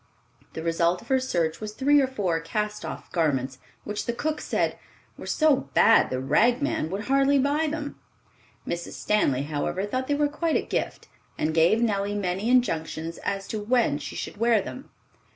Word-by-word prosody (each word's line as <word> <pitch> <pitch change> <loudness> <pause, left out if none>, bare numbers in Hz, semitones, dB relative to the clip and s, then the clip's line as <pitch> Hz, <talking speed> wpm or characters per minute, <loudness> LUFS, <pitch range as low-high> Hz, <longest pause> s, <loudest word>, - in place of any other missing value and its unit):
The 160 - -5
result 170 +2 +1
of 235 - -19
her 265 -1 +3
search 170 -10 -1
was 210 -1 -5
three 285 +4 +4
or 265 - +2
four 195 -10 -1
cast 210 +5 -3
off - - -7
garments, 135 -6 0 0.2
which 210 0 -4
the 235 - 0
cook 300 +5 -2
said - - -1 0.4
"were - - -10
so 310 -4 +2
bad 225 - +6
the 130 - -2
rag 235 - +3
man 285 - -1
would 195 +4 -4
hardly 275 +1 +3
buy 290 +4 +1
them." 295 -1 -5 0.7
Mrs. 170 0 -4
Stanley, 140 -11 +1
however, 155 +6 -2
thought 255 +5 -3
they 290 - +1
were 295 0 +2
quite 310 +2 -1
a - - +2
gift, - - -3 0.3
and 155 +1 0
gave 170 +8 +4
Nellie 205 -2 0
many 195 +2 -1
injunctions 165 -9 0
as 195 -1 -3
to 215 - -3
when 225 - +2
she 150 0 -7
should - - -6
wear 230 0 +3
them. 255 +7 -7
210 Hz, 185 wpm, -26 LUFS, 165-260 Hz, 0.7 s, bad